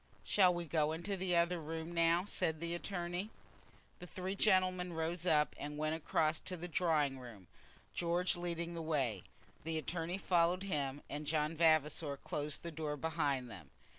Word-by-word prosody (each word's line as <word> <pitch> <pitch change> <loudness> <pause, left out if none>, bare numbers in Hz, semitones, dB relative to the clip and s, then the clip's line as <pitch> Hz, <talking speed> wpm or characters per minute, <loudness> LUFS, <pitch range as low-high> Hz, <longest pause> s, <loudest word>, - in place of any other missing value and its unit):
"Shall 185 -3 +5
we 175 -1 -3
go 155 -1 +1
into 175 +5 -3
the 185 -1 0
other 170 +1 +3
room 160 +2 -5
now?" 170 +2 +3
said 165 -6 0
the 170 +1 -1
attorney. 175 +2 -3 0.7
The 180 - -9
three 185 +2 -4
gentlemen 185 -3 +3
then 165 - -7
rose 165 +2 -1
up, 150 -3 +3
and 150 +1 -5
went 155 +1 0
across 155 0 +1
to 185 -1 -5
the 175 +2 -5
drawing 155 -6 +1
room, 115 -7 -11 0.5
George 175 +1 +1
leading 170 -1 -2
the 165 - -4
way. 135 - 0 0.4
The 160 0 -2
attorney 165 +3 -2
followed 180 -1 +2
him, 145 -7 -2
and 150 +1 -5
John 155 +1 0
Vavasor 155 -2 +3
closed 145 +1 -3
the 170 - -4
door 150 -2 -3
behind 145 -5 0
them. 90 - -10
165 Hz, 170 wpm, -36 LUFS, 150-175 Hz, 0.7 s, Shall